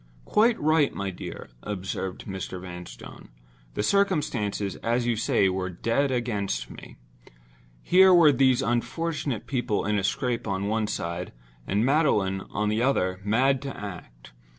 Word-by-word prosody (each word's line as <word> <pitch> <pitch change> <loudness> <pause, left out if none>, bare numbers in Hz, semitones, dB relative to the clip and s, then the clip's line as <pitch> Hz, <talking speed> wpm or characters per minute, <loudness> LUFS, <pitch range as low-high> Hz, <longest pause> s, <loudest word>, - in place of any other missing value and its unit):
"Quite 230 +2 +3
right, 155 -1 +3
my 100 -1 -3
dear," 90 - -8
observed 95 -2 -5
Mr. 95 -1 -5
Vanstone. 90 -1 -10 0.5
"The - - -1
circumstances, 120 - 0
as 120 +1 0
you 120 -1 +1
say, 105 -3 +2
were 95 0 -1
dead 115 +10 0
against 105 - -2
me. - - -12 0.9
Here 190 +1 +6
were 170 -4 +7
these 130 -2 +3
unfortunate 130 0 -2
people 120 -7 -1
in 105 0 +1
a - - -3
scrape 125 +1 -1
on 100 -1 -1
one 110 0 0
side; 85 -3 -4 0.3
and 105 +4 +1
Magdalen, 110 -10 +2
on 105 +1 -1
the 110 +2 0
other, 95 -8 +1
mad 130 +6 +2
to 135 -1 -6
act. 60 -13 -9
110 Hz, 145 wpm, -26 LUFS, 95-135 Hz, 0.9 s, were